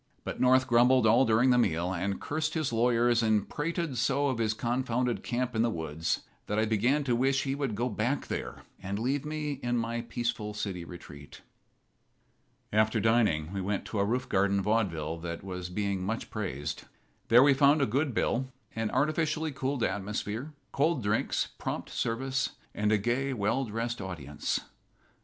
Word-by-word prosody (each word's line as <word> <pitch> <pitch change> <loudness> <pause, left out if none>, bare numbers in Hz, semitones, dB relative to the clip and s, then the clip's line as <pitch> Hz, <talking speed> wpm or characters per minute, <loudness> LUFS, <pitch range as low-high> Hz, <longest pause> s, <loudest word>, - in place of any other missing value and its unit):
But - - -5
North 130 +1 +5
grumbled 125 0 +5
all 115 +4 +5
during 115 +3 +4
the 125 - +4
meal, 90 -4 +1
and 95 +2 -2
cursed 155 +1 -2
his 155 -6 -1
lawyers 120 0 +3
and 110 -3 +2
prated 165 -2 -2
so 135 +4 +2
of 130 -3 -2
his 110 -1 +1
confounded 120 0 -1
camp 125 0 -2
in 110 - +2
the 120 - +3
woods 80 -4 -2 0.3
that 105 - -1
I 110 - +3
began 120 +7 +2
to 125 -3 +1
wish 135 +3 +2
he 135 - -1
would 135 -6 -2
go 120 +4 0
back 120 +5 -1
there - - -5 0.2
and 95 +1 -3
leave 130 +6 -1
me 150 -2 -3
in 120 0 0
my 115 0 -1
peaceful 115 -3 -3
city 95 -4 -3
retreat. 75 -5 -11 1.3
After 110 +1 +3
dining 105 -8 +2
we 100 - -2
went 100 +2 -2
to 110 - -3
a - - +4
roof 125 +5 -1
garden 100 +1 +2
vaudeville 90 -7 0
that 85 0 -5
was 90 -2 -5
being 100 0 -2
much 110 +4 -3
praised. 75 - -4 0.4
There 120 +3 +7
we 140 0 +6
found 140 +3 +5
a 140 - +3
good 135 +2 0
bill, 130 +3 0 0.2
an 110 -1 -1
artificially 155 +3 0
cooled 135 -2 -2
atmosphere, 105 +7 -2 0.2
cold 145 -2 +1
drinks, 105 +2 +1
prompt - - -4
service, 130 +3 -1 0.2
and 105 0 0
a 110 - +5
gay, 125 +6 0
well 115 +4 0
dressed 115 +1 -3
audience. 75 -7 -3
115 Hz, 175 wpm, -29 LUFS, 100-130 Hz, 1.3 s, There